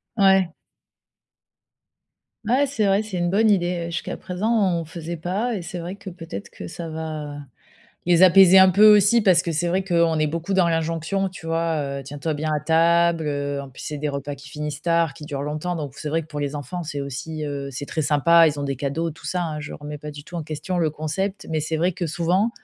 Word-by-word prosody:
Ouais. 190 -4 +4 2.0
Ouais, 255 +6 +3
c'est 265 -6 -1
vrai, 195 +2 +3
c'est 210 -4 -5
une 175 0 0
bonne 215 +4 +3
idée. 175 -3 +1
Jusqu'à 170 - -4
présent, 195 -1 0
on 165 - -5
faisait 170 +1 -6
pas 200 +9 -2
et 195 - -4
c'est 175 +1 -6
vrai 175 +3 -5
que 200 - -9
peut-être 165 - -8
que 90 - -9
ça 165 - -7
va 155 -2 -5 0.7
les 175 0 +4
apaiser 185 0 +8
un 190 0 +7
peu 210 +3 +7
aussi, 210 +4 +4
parce 185 -5 +4
que 170 - -3
c'est 160 +3 0
vrai 185 +3 +1
qu'on 170 -3 +2
est 155 - +3
beaucoup 165 +5 -3
dans 185 -2 +4
l'injonction. 165 +4 -1
Tu 180 -3 -12
vois: 165 0 0 0.3
«Heu, - - -9
tiens 145 +2 -8
toi 155 +2 -2
bien 155 +1 -2
à 150 - 0
table», 165 +1 +3
heu, 145 -1 -2
en 140 - -8
plus, 130 - -12
c'est 150 - -5
des 150 +1 -2
repas 140 0 -4
qui 140 -1 -13
finissent 150 +1 -5
tard, 170 -2 +2
qui 155 - -10
durent 140 -2 -4
longtemps. 155 +5 -3
Donc 145 -4 -5
c'est 150 - -5
vrai 165 +2 0
que - - -14
pour 150 -1 -6
les 145 0 -3
enfants, 145 +5 -5
c'est 145 -2 -4
aussi 145 +3 -5
heu, 140 -1 -4
c'est 135 +3 -5
très 160 - -2
sympa. 165 +3 +5
Ils 145 -1 -4
ont - - -2
des 135 -1 -2
cadeaux, 145 +5 -2
tout 155 - -12
ça, 180 -1 -1
hein. 155 -2 -4
Je 150 - -7
ne - - -7
remets 150 0 -7
pas 150 +1 -7
du 145 0 -9
tout 175 - -13
en 165 - -3
question 155 +4 -4
le 160 -3 +2
concept 155 +6 -3
mais 160 -1 0
c'est 160 +1 -2
vrai 175 +4 +1
que 175 0 -3
souvent, 175 +7 +1
165 Hz, 240 wpm, -23 LUFS, 150-180 Hz, 2.0 s, apaiser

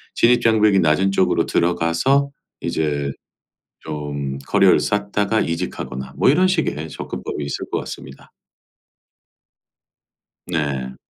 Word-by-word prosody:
진입장벽이 110 -4 +4
낮은 90 +4 +2
쪽으로 95 - +2
들어가서 85 +12 +1 0.3
이제 75 -3 -1 0.7
좀 70 -3 -5
커리어를 70 - +3
쌓다가 105 +1 0
이직하거나 75 -7 -4
뭐 - - +4
이런 180 +7 +4
식의 115 - -1
접근법이 70 0 -5
있을 70 - -5
것 - - 0
같습니다. 65 - -10 2.1
네. 70 -6 -2
85 Hz, 250 characters per minute, -20 LUFS, 70-105 Hz, 2.1 s, 진입장벽이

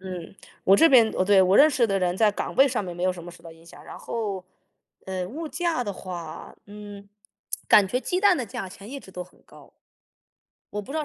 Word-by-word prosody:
嗯， 185 -2 -8 0.3
我 195 - +6
这 330 - +6
边 235 -6 +6
哦， 185 - +1
对， 195 0 +5
我 185 +2 +3
认 300 - +8
识 250 -5 +2
的 195 -2 0
人 180 -1 -1
在 215 +1 +4
岗 - - -5
位 270 - +6
上 250 -5 -1
面 175 -2 -7
没 175 - -5
有 185 0 +2
什 175 -1 -10
么 175 - -9
受 170 -1 -17
到 165 -1 -11
影 165 0 -19
响， 170 - -15
然 - - -10
后 205 -5 -4 0.6
呃， 185 -1 -3
物 310 - -6
价 330 -4 -2
的 205 - -3
话， 175 -4 -8
嗯， 205 -1 -11 0.6
感 205 - +6
觉 250 +7 -2
鸡 365 +6 -2
蛋 400 -3 +5
的 250 - -3
价 195 -1 -6
钱 195 +4 -12
一 280 - -6
直 195 - -15
都 180 -1 -6
很 180 - -20
高。 - - -18 1.0
我 210 - -4
不 235 - -10
知 315 - -2
道 305 - -2
200 Hz, 260 characters per minute, -25 LUFS, 180-245 Hz, 1.0 s, 认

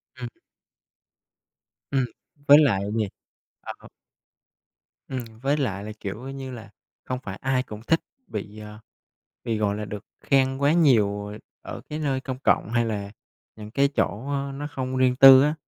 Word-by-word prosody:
Ừm. 125 -1 -6 1.6
Ừm, 135 -2 +2 0.4
với 145 - +10
lại 115 -11 +4 0.2
gì? 110 -2 +1 0.5
À, - - -6
h - - -13 1.2
Ừm, 130 -1 -3 0.2
với 140 +2 +1
lại 105 -9 -2
là, 110 - -6
kiểu 105 +4 -6
như 135 -1 -6
là, 110 -3 -9 0.4
không 125 0 -3
phải 95 -3 -6
ai 130 -1 +1
cũng 105 -4 -9
thích 165 - +4 0.3
bị, 105 - -6
ờ, 105 0 -10 0.7
bị, 115 -3 -1
gọi 105 -1 0
là, 105 - -4
được 105 0 -7 0.2
khen 135 -1 +2
quá 140 +1 +3
nhiều 105 -11 +3 0.3
ở - - -7
cái 150 - -3
nơi 140 -4 -1
công 130 -1 -5
cộng 120 - +2
hay 120 0 +2
là 105 -3 -3 0.5
những 105 -1 -9
cái 140 +4 +3
chỗ, 135 -2 -2
a, 140 -1 -2
nó 145 +2 -5
không 130 -1 -3
riêng 130 -1 +3
tư 135 0 +10
á, 150 +2 +2
130 Hz, 170 wpm, -25 LUFS, 105-135 Hz, 1.6 s, với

